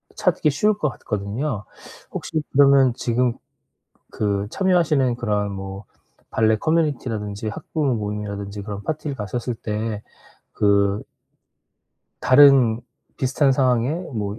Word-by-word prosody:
찾기 180 -6 +1
쉬울 210 +10 +2
것 150 - 0
같거든요. 105 +2 -4 0.5
혹시 155 - -3
그러면 135 -2 +5
지금 120 0 0 0.8
그 100 -1 -1
참여하시는 160 -10 +2
그런 105 -4 -1
뭐 95 +1 -7 0.5
발레 110 0 +3
커뮤니티라든지 115 -10 -1
학부모 140 +5 -2
모임이라든지 105 -1 -4
그런 100 -1 -6
파티를 150 +2 -4
가셨을 120 +3 -3
때 105 0 -3 0.6
그 100 0 +2 1.2
다른 130 -4 +6 0.4
비슷한 135 +2 +2
상황에 125 -2 +2 0.2
뭐 105 -1 -3
115 Hz, 260 characters per minute, -22 LUFS, 105-140 Hz, 1.2 s, 다른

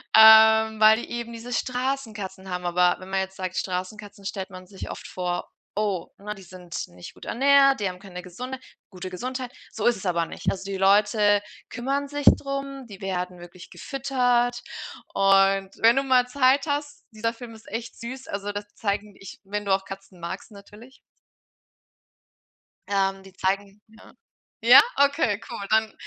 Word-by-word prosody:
ähm, 220 0 +8
weil 220 +1 +6
die - - -9
eben 235 0 -5
diese 230 +2 -8
Straßenkatzen 225 -8 -3
haben. 180 0 -4
Aber 175 0 +3
wenn 185 +1 -11
man 190 0 0
jetzt 190 0 -6
sagt 185 -1 -4
„Straßenkatzen“ 195 +2 -5
stellt 195 0 -4
man 185 -1 -11
sich 195 -2 -8
oft - - -8
vor: 180 -1 -3 0.3
„Oh, 200 -5 -1
ne, 210 +1 -6
die 195 - -13
sind 180 -1 -7
nicht 90 0 -11
gut - - -13
ernährt, 275 +1 +4
die 200 -2 0
haben 180 - -8
keine 185 -3 -9
gesunde 250 +9 -7 0.3
gute 185 0 -7
Gesundheit.“ 255 +6 -5 0.2
So 225 +1 -1
ist 240 -2 +3
es 190 - -10
aber 170 -2 +1
nicht. - - -2
Also, 190 0 -6
die 195 - -3
Leute 205 +1 +4 0.3
kümmern 275 +3 -2
sich 290 -1 -4
drum, 275 -1 -5
die 200 -4 -12
werden 180 -2 -3
wirklich 175 +1 -12
gefüttert. 245 -3 0 0.5
Und, 195 0 +4
wenn 230 +2 +6
du 275 - +3
mal 255 -2 +3
Zeit 265 +3 +3
hast, 290 0 -3
dieser 225 +1 -2
Film 230 -1 -10
ist 220 - -17
echt 230 +2 -6
süß, 260 +3 -7
also, 200 +1 -4
das 205 0 -5
zeigen 205 -1 -3
ich 195 - -11
wenn 205 +1 -4
du 195 - +2
auch 190 0 0
Katzen 195 -1 -10
magst 170 +6 -6
natürlich. 210 +5 -15 1.9
Ähm, 195 -1 0
die 195 - -15
zeigen 195 +2 -2
'ne 220 - -17 0.5
ja, 245 +3 +10 0.2
okay, 280 -7 +3
cool. 200 - -5
Dann 220 0 +2
210 Hz, 175 wpm, -25 LUFS, 190-245 Hz, 1.9 s, ja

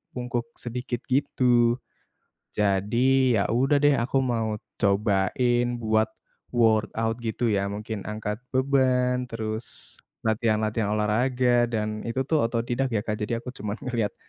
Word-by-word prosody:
bungkuk 120 -1 -3
sedikit 120 +1 -5
gitu. 120 -3 +3 0.8
Jadi 115 +6 +2
ya 100 - +1
udah 135 +5 +3
deh, 145 -3 +4
aku 120 +3 -1
mau 115 -3 -1 0.2
cobain 105 +5 +2
buat 110 -2 +1 0.5
workout 115 0 +2
gitu 120 0 -1
ya 100 -1 +1
mungkin 105 0 -5
angkat 105 0 -4 0.2
beban 130 -1 +2
terus 110 -1 -6 0.2
latihan-latihan 110 -1 +1
olahraga 120 +3 +2
dan 110 -2 -2
itu 125 +3 -1
tuh 150 -2 +1
autodidak 120 +2 -1
ya, 105 - +1
Kak. 105 -1 -3
Jadi 105 +2 -2
aku 125 - -6
cuman 105 -4 -5
ngelihat 120 -5 -1
115 Hz, 125 wpm, -26 LUFS, 110-125 Hz, 0.8 s, deh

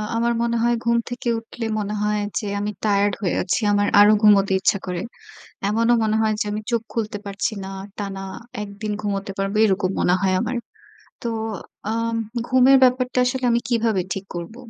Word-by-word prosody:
আমার 235 +1 +1
মনে 235 0 0
হয় 240 0 +3
ঘুম 235 0 +2
থেকে 245 0 -5
উঠলে 225 +1 -7
মনে 210 0 -3
হয় 210 0 +1 0.2
যে, 225 - -6
আমি 205 +1 -2
tired 205 -1 +2
হয়ে 185 - 0
আছি, 180 - 0
আমার 205 0 +2
আরো 205 +1 +8
ঘুমোতে 200 -2 +5
ইচ্ছা 190 - +2
করে। 180 -2 -3 0.7
এমনও 230 +3 +3
মনে 215 0 +1
হয় 220 -1 +2
যে - - +1
আমি 210 +1 -3
চোখ 235 -1 +1
খুলতে 215 -2 -2
পারছি 200 +2 -2
না, 190 - -6 0.3
টানা 195 -2 -4 0.4
১ 210 - -5
দিন 215 -1 -2
ঘুমোতে 200 -1 -3
পারব, 195 0 -1
এরকম 190 -2 +1
মনে 180 - +3
হয় 190 -1 +2
আমার। 255 - -2 0.7
তো - - -3 0.6
আম 230 0 -1 0.3
ঘুমের 260 +1 +6
ব্যাপারটা 255 0 +2
আসলে 255 0 -1
আমি 235 - +3
কীভাবে 225 -5 +1
ঠিক 195 0 -6
করব? 175 +5 -6
210 Hz, 185 wpm, -22 LUFS, 200-235 Hz, 0.7 s, আরো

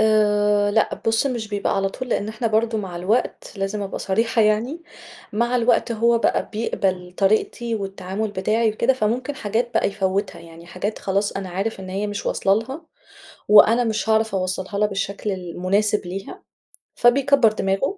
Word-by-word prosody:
آآ، 210 -1 +3
لأ 220 +1 +2
بُصّ، 225 +4 +2
مش 235 -5 -3
بيبقى 205 -1 -1
على 195 0 +1
طول 255 +5 -7
لأن 210 -2 -1
إحنا 220 +2 -3
برضه 220 0 +1
مع 185 -4 -5
الوقت 205 +8 -1
لازم 200 +1 -2
أبقى 195 - -5
صريحة 225 +3 +1
يعني، 230 +10 0 0.5
مع 235 +3 +1
الوقت 235 0 +2
هو 230 +1 +3
بقى - - 0
بيقبل 185 -4 -2
طريقتي 220 +3 +1
والتعامل 195 +1 -4
بتاعي 215 +3 +1
وكده، 235 +4 +2
فممكن 255 +4 -1
حاجات 235 +2 -2
بقى - - +2
يفوّتها 195 -2 -2
يعني 170 0 -13
حاجات 200 +5 -4
خلاص 200 +1 -1
أنا 195 -1 -5
عارف 195 +3 -3
إن 185 - -8
هي 200 +2 -2
مش 205 0 -5
واصلة 195 0 +2
لها 270 +8 -7 0.6
وأنا 225 +3 +7
مش 220 0 -2
هاعرف 220 -1 +2
أوصّلها 185 +1 -2
لها 210 - +3
بالشكل 200 +1 -3
المناسب 190 +3 -1
ليها، 195 +2 -7 0.5
فبيكبّر 260 -1 +4
دماغه 210 - -1
210 Hz, 165 wpm, -22 LUFS, 195-230 Hz, 0.6 s, وأنا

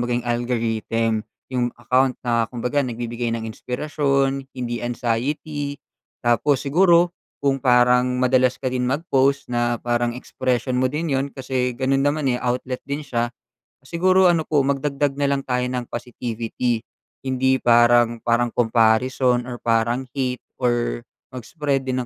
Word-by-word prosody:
baga 120 0 0
yung 120 - -3
algorithm 115 -1 0 0.3
yung 125 -2 -1
account 125 +2 +2
na 115 -1 +2
kumbaga 125 +4 -1
nagbibigay 120 -1 -3
ng 115 -1 -3
inspirasyon, 135 +2 -1
hindi 120 -2 -4
anxiety. 140 +5 -2 0.4
Tapos, 125 +4 +2
siguro 170 +4 +3 0.2
kung 135 -2 0
parang 125 0 +4
madalas 130 0 +2
ka 135 - -5
din 125 -1 -1
mag-post 140 0 +1
na 120 -1 0
parang 120 0 0
expression 125 0 -2
mo 130 0 +1
din 155 +4 -2
'yun 135 +1 -1
kasi 130 -2 -2
ganun 135 +1 +1
naman, 145 +1 0
eh, 125 - +2
outlet 125 +1 -2
din 140 +1 -4
siya, 120 -2 -1 0.5
siguro 185 +6 +3
ano 165 -2 +1
po, 145 -2 +2
magdagdag 140 0 -1
na 145 - +1
lang 140 - -1
tayo 125 -1 -1
ng 125 -1 -4
positivity. 120 -1 -3 0.4
Hindi 130 0 +2
parang 120 -1 +4
parang 120 0 +1
comparison 120 +2 +2
or 120 - -5
parang 120 +2 0
hate 130 -2 -2 0.2
or 120 -1 0 0.3
mag-spread 135 +3 -2
din 130 -1 -1
125 Hz, 140 wpm, -22 LUFS, 120-135 Hz, 0.5 s, parang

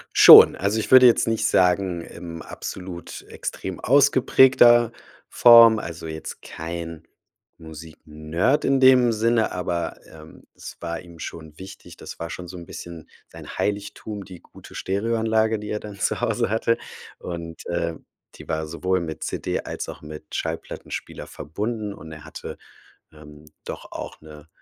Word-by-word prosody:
Schon. - - +10
Also, 100 +4 -1
ich 110 - -5
würde 130 -1 +9
jetzt 120 -1 +4
nicht 115 0 0
sagen, 90 -1 +2
im 85 -1 -9
absolut 90 -2 -8
extrem 95 -2 -6
ausgeprägter 130 -3 +5 0.4
Form. 115 -2 +7
Also, 85 -2 -8
jetzt 80 0 -8
kein 85 0 -7 0.5
Musiknerd 80 - -3
in 135 -1 +2
dem 125 -3 +5
Sinne, 115 +1 +1
aber, 85 -2 -3
ähm, 80 0 -15
es - - -10
war 85 -1 -4
ihm 85 -2 -15
schon 80 -1 -9
wichtig. 95 +1 -12
Das - - -11
war 85 0 -5
schon 90 0 -8
so 90 +1 -9
'n 85 - -10
bisschen 85 -2 -10 0.2
sein - - -11
Heiligtum, 105 0 -4
die 90 -3 -12
gute - - -16
Stereoanlage, 110 +2 0
die 105 - -8
er 105 - -3
dann 105 -1 -10
zu - - -1
Hause - - 0
hatte 115 +1 0 0.4
und, 85 -1 -8
äh, 85 -1 -2 0.4
die - - -13
war 80 0 -2
sowohl 95 +3 -1
mit 80 -2 -6
CD - - -3
als - - -6
auch - - -9
mit 75 0 -11
Schallplattenspieler 80 0 -6
verbunden 105 +4 -5
und 80 -2 -12
er 75 -1 -11
hatte, - - -9 0.6
ähm, 75 0 -15 0.2
doch - - -8
auch - - -8
'ne 75 0 -14
90 Hz, 150 wpm, -23 LUFS, 80-110 Hz, 0.6 s, Schon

